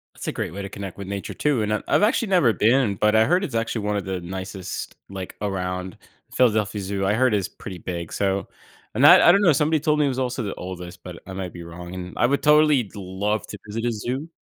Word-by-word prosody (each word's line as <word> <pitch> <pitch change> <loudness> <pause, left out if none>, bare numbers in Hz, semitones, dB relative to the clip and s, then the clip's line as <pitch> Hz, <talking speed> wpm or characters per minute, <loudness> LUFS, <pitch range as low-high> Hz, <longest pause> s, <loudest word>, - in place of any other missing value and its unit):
That's - - -8
a - - 0
great - - -4
way 100 - -5
to 100 - -6
connect 100 -2 -7
with 100 -1 -7
nature 100 -1 -5
too, 145 -6 +1
and 105 0 0
I've 105 - -2
I've - - +3
actually 220 0 +2
never 145 - +4
been, 115 -2 +3
but 105 +2 +2
I 110 0 +5
heard 180 +3 +2
it's 130 -10 -4
actually 115 -2 -1
one 105 0 0
of 100 - -4
the 95 -1 -3
nicest 95 +1 -6
like 95 -2 -7
around 90 -2 -3 0.4
Philadelphia 105 -4 +2
Zoo, 95 0 -2
I 100 - +2
heard 125 0 +3
it's 100 -3 +1
pretty 95 -2 -9
big, 85 -2 -5
so, 100 -1 -1 0.5
and - - +4
I - - +11
I - - +10
don't 200 +3 +4
know, 170 -6 +5
somebody 150 +3 +2
told 150 0 +1
me 150 - +4
it - - +2
was 130 0 -3
also 125 -1 -2
the 100 - -4
oldest, 90 -1 -8
but 90 -2 -8
I 95 - -7
might 95 -2 -5
be 85 -1 -8
wrong, 85 +1 -9
and 90 -1 -7
I - - +3
would 140 +3 +1
totally 150 -7 +4
love 100 +2 -2
to 105 - -8
visit 115 +3 -4
a 120 - +1
zoo. 125 +8 -4
105 Hz, 255 wpm, -23 LUFS, 95-130 Hz, 0.5 s, I